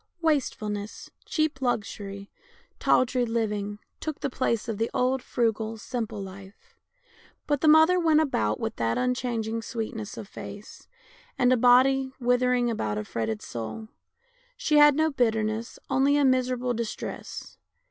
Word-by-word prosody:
Wastefulness, 215 -9 -1
cheap 310 -4 -1
luxury, 200 -5 -3 0.5
tawdry 255 0 +3
living, 210 -3 -2 0.2
took 310 -2 -4
the 275 - -2
place 235 -4 -1
of 220 -2 -3
the 225 - 0
old, 255 +1 +1
frugal, 225 -2 -1
simple 225 -2 -4
life. 195 - -11 0.7
But 290 -2 0
the 315 - +3
mother 320 +4 +6
went 320 -3 +4
about 110 - 0
with - - -3
that 115 0 0
unchanging 235 -3 -1
sweetness 220 -1 -5
of 205 - -7
face, 205 +1 -10 0.5
and 250 0 +4
a - - +5
body 260 +2 +4
withering 245 0 +2
about 110 - -2
a 105 - -2
fretted 110 0 -3
soul. 120 - -6 0.7
She 300 - +2
had 295 -1 +7
no 315 +1 +2
bitterness, 225 -3 0
only 275 +1 +3
a 290 - +3
miserable 255 -1 +1
distress. 230 -1 -6
240 Hz, 135 wpm, -27 LUFS, 215-265 Hz, 0.7 s, had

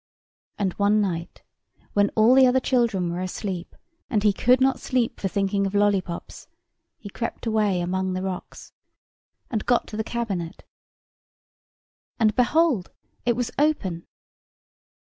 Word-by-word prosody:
And 195 -3 -1
one 205 +1 +3
night, 175 -4 -3 0.5
when 205 0 +3
all 220 +3 +5
the 260 0 +7
other 255 +1 +3
children 230 -10 +1
were 175 +1 -3
asleep, 185 -1 -5 0.3
and 215 -6 0
he 210 -2 +4
could 250 +5 +3
not 265 0 +2
sleep 250 -3 -1
for 195 - -1
thinking 200 +1 0
of 195 - -5
lollipops, 195 -4 -1 0.5
he 205 - -10
crept 230 +4 -5
away 210 -5 +1
among 185 +1 -1
the 185 0 -3
rocks, 190 -2 -7 0.8
and 220 -3 -1
got 245 -1 +2
to 210 - -6
the 220 - -1
cabinet, 200 -8 -4 1.6
and 215 -2 +3
behold! 255 - +2 0.4
it 240 - +3
was 245 0 -2
open. 195 - 0
205 Hz, 140 wpm, -24 LUFS, 190-240 Hz, 1.6 s, the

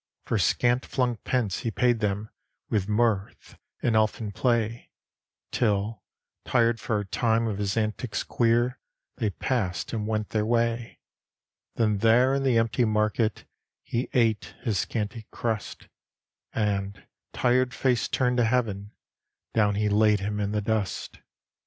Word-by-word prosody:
For - - 0
scant 120 +1 +2
flung 125 -3 -1
pence 110 -4 -1
he 115 - -2
paid 120 +1 +2
them 105 0 -2 0.4
With 105 -2 0
mirth 105 -2 -1 0.2
and 115 - +2
elfin 110 0 +1
play, 115 +1 0 0.6
Till, 105 -2 0 0.4
tired 115 -2 +2
for 110 0 -1
a 105 - -4
time 115 +3 +1
of 105 -3 -2
his 100 0 -1
antics 110 +1 -1
queer, 120 +2 +1 0.4
They 110 -5 0
passed 100 -4 -2
and 105 -2 -2
went 110 -1 -1
their 105 -1 0
way; 115 +1 0 0.8
Then 105 -3 +1
there 120 +4 +4
in 140 - +1
the 130 -3 +3
empty 115 +2 +2
market 110 0 0 0.4
He 120 +2 -2
ate 115 -4 +1
his 110 -6 0
scanty 110 0 -3
crust, 110 -3 -4 0.6
And, 100 -2 -2 0.3
tired 125 +1 +2
face 125 -2 +1
turned 125 -1 +1
to 120 - +4
heaven, 110 -4 -1 0.6
down 105 -2 +3
He 105 +1 +1
laid 105 0 +4
him 105 +1 -3
in 100 0 -1
the 105 0 0
dust. 105 -2 -2
110 Hz, 140 wpm, -26 LUFS, 105-120 Hz, 0.8 s, there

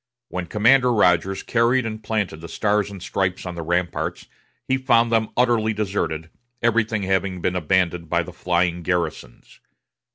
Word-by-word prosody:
When 90 -1 -4
Commander 125 +7 +4
Rodgers 95 -3 +2
carried 120 +2 +2
and 110 -1 -5
planted 105 -8 -2
the 85 - -8
Stars 105 -1 0
and 100 -3 -9
Stripes 90 -1 -2
on 90 - -4
the 85 - -6
ramparts, 85 +1 -2 0.4
he 130 - +2
found 120 -3 +3
them 110 -1 +2
utterly 120 -3 +2
deserted, 95 -6 -3 0.3
everything 110 -2 +1
having 95 -1 0
been 90 +1 -1
abandoned 90 -1 0
by - - +1
the - - -10
flying 90 -1 0
garrisons. 85 -8 -4
95 Hz, 155 wpm, -22 LUFS, 90-110 Hz, 0.4 s, Commander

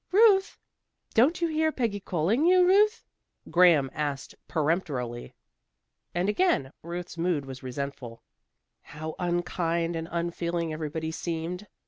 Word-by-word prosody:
"Ruth!" 395 -1 +5 0.6
"Don't 285 +10 +3
you - - +3
hear 315 0 +1
Peggy 230 -8 -1
calling 190 - 0
you, 365 0 +6
Ruth?" 420 +4 +4 0.5
Graham 170 -7 +5
asked 145 -3 -3
peremptorily. 145 -7 -2 0.8
And 175 +2 +1
again 210 - +1
Ruth's 170 0 -6
mood 165 -5 0
was 130 -1 -8
resentful. 130 -2 -6 0.6
How 155 +1 -7
unkind 175 -1 -1
and 165 0 -4
unfeeling 170 -1 -2
everybody 160 +1 -4
seemed. 170 +4 -4
170 Hz, 115 wpm, -27 LUFS, 155-210 Hz, 0.8 s, you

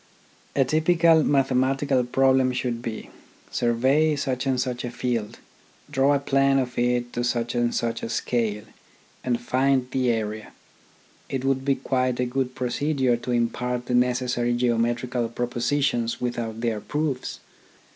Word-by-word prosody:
A 135 - +3
typical 165 +2 +4
mathematical 135 -1 +2
problem 130 +1 +3
should 120 -2 -2
be: 115 -2 -6 0.4
Survey 130 +6 +2
such 135 -2 -2
and 130 -1 +1
such 125 -1 -2
a 120 - -3
field, 120 -3 -3 0.5
draw 140 0 +3
a - - +1
plan 135 0 +2
of 125 -2 -1
it 120 0 0
to 120 - -1
such 120 -1 -1
and 120 -1 +1
such 115 -1 -1
a - - -4
scale, 110 -4 -1 0.6
and 120 -2 0
find 130 +1 +1
the 130 -2 +1
area. 110 -2 -3 0.8
It 135 -1 -3
would 135 -1 +1
be 135 0 +2
quite 130 -2 -1
a 125 - +2
good 130 0 -2
procedure 130 0 0
to 125 - -5
impart 125 +1 -1
the 125 - -3
necessary 125 -1 +1
geometrical 120 0 0
propositions 120 0 -1
without 115 -2 -3
their 115 -3 -1
proofs. 150 -2 -3
125 Hz, 145 wpm, -24 LUFS, 120-135 Hz, 0.8 s, typical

